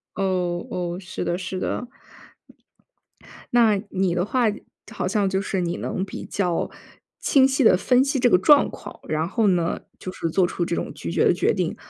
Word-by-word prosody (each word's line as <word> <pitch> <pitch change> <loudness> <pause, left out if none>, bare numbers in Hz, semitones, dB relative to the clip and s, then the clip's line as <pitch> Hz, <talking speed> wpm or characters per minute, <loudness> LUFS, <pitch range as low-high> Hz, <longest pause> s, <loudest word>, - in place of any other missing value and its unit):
哦 180 -2 -1
哦， 175 -1 -3
是 185 -1 -6
的 175 - -1
是 185 0 -5
的。 245 - -3 1.7
那 225 -4 +4
你 185 -2 0
的 180 +1 0
话， 245 +3 +1 0.5
好 210 - -3
像 200 0 +1
就 190 0 0
是 195 -2 -2
你 170 0 -2
能 185 - -3
比 195 - -8
较 180 -4 -1 0.5
清 265 -2 +4
晰 270 0 +1
地 220 - +6
分 250 +6 +3
析 275 0 -1
这 245 - +4
个 180 - +6
状 285 +10 +5
况， - - -10
然 155 +1 -1
后 220 +3 +1
呢， 175 -3 +1 0.2
就 185 - -6
是 165 - -3
做 185 +3 +2
出 175 -1 -2
这 170 - -2
种 - - -3
拒 - - -6
绝 - - +2
的 - - +5
决 - - +1
定。 - - -2
190 Hz, 205 characters per minute, -23 LUFS, 175-225 Hz, 1.7 s, 地